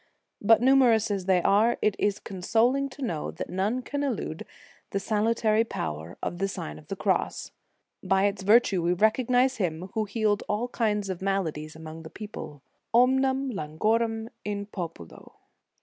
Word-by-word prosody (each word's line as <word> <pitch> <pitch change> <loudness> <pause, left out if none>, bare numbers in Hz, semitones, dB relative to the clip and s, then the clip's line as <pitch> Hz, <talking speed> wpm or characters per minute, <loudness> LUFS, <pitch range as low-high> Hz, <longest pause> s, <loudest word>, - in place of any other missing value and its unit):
But 225 +3 +5
numerous 245 -5 +4
as 195 -3 -2
they 185 -2 +3
are, 220 +4 +4
it 210 -2 +1
is 205 -1 +1
consoling 235 +9 +1
to 275 +1 -9
know 165 -11 -2
that - - -6
none 210 +7 -1
can 285 +2 -3
elude 240 - -3 0.4
the 200 - -1
salutary 220 +1 +2
power 80 - -5
of 175 - -3
the 195 - +1
Sign 75 - -6
of 75 - -18
the - - -4
Cross. - - -1 0.5
By 195 +1 +2
its 200 -1 -1
vir 215 +5 +6
tue 190 -6 -1
we 170 +1 +2
recognize 245 +6 +2
Him 180 -2 -2
who 220 -2 0
healed 210 0 0
all 220 +4 -1
kinds 210 -4 0
of 185 - -6
maladies 160 -6 -2
among 160 0 -9
the 160 - -10
people; 155 -10 -9 0.3
omnem 265 +2 +3
Ian 155 -4 -6
guorem 225 +3 +1
in 205 -1 -3
populo. 165 - -8
205 Hz, 165 wpm, -27 LUFS, 180-230 Hz, 0.5 s, vir